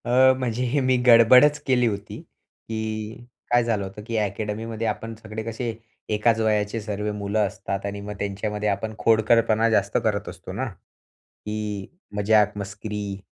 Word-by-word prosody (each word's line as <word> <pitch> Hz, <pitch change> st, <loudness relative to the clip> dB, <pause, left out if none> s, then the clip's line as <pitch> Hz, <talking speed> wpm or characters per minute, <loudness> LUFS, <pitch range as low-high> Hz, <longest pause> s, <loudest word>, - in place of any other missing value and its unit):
अ, 130 Hz, +2 st, +5 dB
म्हणजे 125 Hz, -1 st, -2 dB
हे 130 Hz, +4 st, +1 dB
मी 130 Hz, 0 st, +3 dB
गडबडच 125 Hz, +5 st, +7 dB
केली 125 Hz, -2 st, +3 dB
होती, 100 Hz, -2 st, -4 dB
की 110 Hz, +1 st, -7 dB, 0.3 s
काय 120 Hz, 0 st, +5 dB
झालं 110 Hz, -4 st, 0 dB
होतं, 95 Hz, +2 st, -8 dB
की 115 Hz, -, -3 dB
अकॅडमीमध्ये 110 Hz, +2 st, -2 dB
आपण 115 Hz, +1 st, -3 dB
सगळे 110 Hz, 0 st, -7 dB
कसे 115 Hz, +1 st, -3 dB, 0.4 s
एकाच 110 Hz, +1 st, +2 dB
वयाचे 105 Hz, 0 st, +1 dB
सर्व 105 Hz, 0 st, -3 dB
मुलं 100 Hz, +1 st, -2 dB
असतात 100 Hz, 0 st, -5 dB
आणि 100 Hz, 0 st, -4 dB
मग 105 Hz, +1 st, -6 dB
त्यांच्यामध्ये 105 Hz, +1 st, -2 dB
आपण 105 Hz, +2 st, -2 dB
खोडकरपणा 115 Hz, 0 st, +3 dB
जास्त 110 Hz, -, +2 dB
करत -, -, -1 dB
असतो -, -, -9 dB
ना, -, -, -2 dB
की 105 Hz, -2 st, -8 dB, 0.3 s
मजाक-मस्करी. 105 Hz, -1 st, 0 dB
110 Hz, 145 wpm, -24 LUFS, 105-115 Hz, 0.4 s, गडबडच